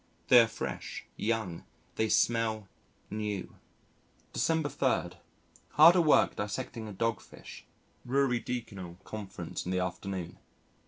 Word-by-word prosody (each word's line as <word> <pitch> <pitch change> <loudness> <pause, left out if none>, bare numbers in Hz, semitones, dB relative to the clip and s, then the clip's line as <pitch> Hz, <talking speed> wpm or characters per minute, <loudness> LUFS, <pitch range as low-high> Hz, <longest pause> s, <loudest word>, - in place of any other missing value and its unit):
They 125 - +9
are 115 - +6
fresh, 110 - -5
young, 110 -6 -2 0.3
they 110 0 0
smell 110 -2 +2 0.4
new. 105 -3 -3 0.8
December 160 -2 +1
3. 130 -10 0 0.6
Hard 165 +4 +8
at 175 - +5
work 155 - +4
dissecting 110 +2 -4
a - - -7
Dogfish. 115 +1 -4 0.4
Ruridecanal 120 -8 -2
Conference 95 -5 -6
in 90 - -4
the 90 - 0
afternoon. 90 -1 -4
110 Hz, 110 wpm, -30 LUFS, 95-125 Hz, 0.8 s, They